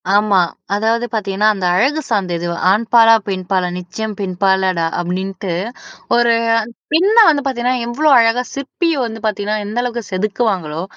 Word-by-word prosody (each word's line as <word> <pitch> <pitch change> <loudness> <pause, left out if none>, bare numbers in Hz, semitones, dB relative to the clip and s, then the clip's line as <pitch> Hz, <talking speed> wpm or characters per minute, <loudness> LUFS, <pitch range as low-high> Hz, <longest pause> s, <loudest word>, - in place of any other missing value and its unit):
ஆமா. 205 -2 +3 0.4
அதாவது 225 +3 0
பார்த்தீங்கன்னா, 205 -1 0
அந்த 195 -3 -4
அழகு 275 +11 +1
சார்ந்தது, 180 -6 -1 0.2
"ஆண்பாலா, 225 +2 +5
பெண்பாலா 185 -1 -1
நிச்சயம் 210 +4 -6
பெண்பாலடா!" 190 -2 0
அப்டின்ட்டு 185 +1 -4 0.6
ஒரு 240 -1 +3 0.6
பெண்ண 385 +7 +3
வந்து 290 -2 +1
பார்த்தீங்கன்னா, 255 -1 -1
எவ்ளோ 295 +6 +1
அழகா 230 +2 +2
சிற்பிய 320 +4 -2
வந்து 225 -1 -7
பார்த்தீங்கன்னா 210 0 -2
எந்த 215 +4 -3
அளவுக்கு 240 -2 -5
செதுக்குவாங்களோ, 185 -5 -2
215 Hz, 125 wpm, -17 LUFS, 190-240 Hz, 0.6 s, ஆண்பாலா